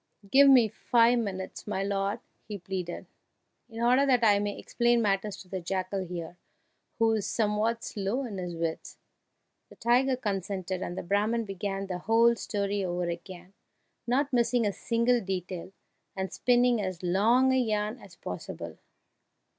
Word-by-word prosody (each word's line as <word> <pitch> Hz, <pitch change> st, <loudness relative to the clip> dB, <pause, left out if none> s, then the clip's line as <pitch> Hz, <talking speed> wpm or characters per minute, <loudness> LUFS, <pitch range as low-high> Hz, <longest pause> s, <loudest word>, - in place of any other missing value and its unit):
"Give 280 Hz, +1 st, +7 dB
me 250 Hz, -4 st, +7 dB
five 235 Hz, +3 st, +3 dB
minutes, 190 Hz, -4 st, -5 dB
my 195 Hz, -2 st, -1 dB
lord!" 200 Hz, +2 st, -1 dB, 0.3 s
he 210 Hz, -2 st, -5 dB
pleaded, 180 Hz, -2 st, -5 dB, 0.6 s
"in 230 Hz, 0 st, -5 dB
order 250 Hz, +3 st, +4 dB
that 255 Hz, -4 st, +3 dB
I 205 Hz, -2 st, +5 dB
may 205 Hz, 0 st, -2 dB
explain 240 Hz, 0 st, +1 dB
matters 205 Hz, -1 st, 0 dB
to -, -, -23 dB
the 185 Hz, 0 st, -5 dB
jackal 185 Hz, +2 st, -2 dB
here, 175 Hz, -1 st, -7 dB, 0.6 s
who 225 Hz, -1 st, +3 dB
is 215 Hz, -3 st, -1 dB
somewhat 220 Hz, +1 st, 0 dB
slow 210 Hz, +6 st, -2 dB
in 205 Hz, -5 st, -6 dB
his 175 Hz, -1 st, -5 dB
wits." 165 Hz, -1 st, -4 dB, 0.7 s
The -, -, -15 dB
tiger 255 Hz, +3 st, +2 dB
consented, 190 Hz, -4 st, -3 dB
and 175 Hz, -, -4 dB
the -, -, -3 dB
Brahman 210 Hz, +5 st, 0 dB
began 195 Hz, 0 st, -4 dB
the 180 Hz, -2 st, -4 dB
whole 230 Hz, +4 st, +4 dB
story 200 Hz, -2 st, -2 dB
over 175 Hz, -1 st, -2 dB
again, 180 Hz, +2 st, -8 dB, 0.5 s
not 270 Hz, +3 st, +1 dB
missing 240 Hz, -1 st, +2 dB
a 205 Hz, -, 0 dB
single 235 Hz, +3 st, +1 dB
detail, 185 Hz, -2 st, -5 dB, 0.4 s
and 190 Hz, -1 st, -4 dB
spinning 245 Hz, -2 st, +3 dB
as 185 Hz, -2 st, -4 dB
long 230 Hz, +9 st, +3 dB
a -, -, +3 dB
yarn 215 Hz, -1 st, -1 dB
as 195 Hz, -6 st, -15 dB
possible. 90 Hz, -, -7 dB
205 Hz, 155 wpm, -28 LUFS, 185-235 Hz, 0.7 s, Give